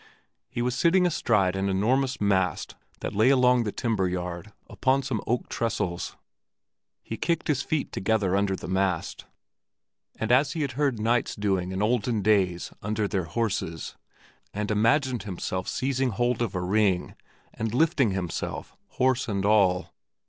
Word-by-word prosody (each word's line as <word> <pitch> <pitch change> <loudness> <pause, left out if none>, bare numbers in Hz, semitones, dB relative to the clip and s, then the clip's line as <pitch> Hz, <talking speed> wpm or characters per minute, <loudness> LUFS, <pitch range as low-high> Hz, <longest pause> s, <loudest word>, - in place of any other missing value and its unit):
He 120 - -2
was 125 0 0
sitting 175 +7 +3
astride 105 - +2
an 95 +1 0
enormous 130 +7 +1
mast 95 -5 0 0.3
that - - -4
lay 110 +5 +4
along 125 -3 +4
the 105 - -1
timber 105 -5 0
yard 90 +2 -5 0.2
upon 135 +1 +1
some 125 -5 -2
oak 120 +2 0
trestles. 95 -7 -2 0.9
He 115 - -6
kicked 170 +5 -1
his 140 -3 +1
feet 155 0 -2
together 100 -2 +1
under 100 -1 +1
the - - -8
mast, 95 -2 -1 0.9
as 125 +6 +3
he 160 - -1
had 140 - -2
heard 140 0 0
of 110 - -7
knights 120 +2 +1
doing 95 -3 -1
in 95 +2 -1
olden 115 -1 +1
days 95 -4 +2
under 105 0 -1
their 95 -3 -1
horses, 95 -4 -3 0.6
and 105 0 -2
imagined 125 +4 +2
himself 95 -1 -4
seizing 135 0 0
hold 120 +2 0
of 115 -6 -1
a 90 - -1
ring 95 -1 +1 0.4
and 110 0 -3
lifting 140 -1 +3
himself, 95 -3 -4
horse 130 0 +1
and 100 -3 -1
all. 95 -4 +3
110 Hz, 155 wpm, -26 LUFS, 95-125 Hz, 0.9 s, lay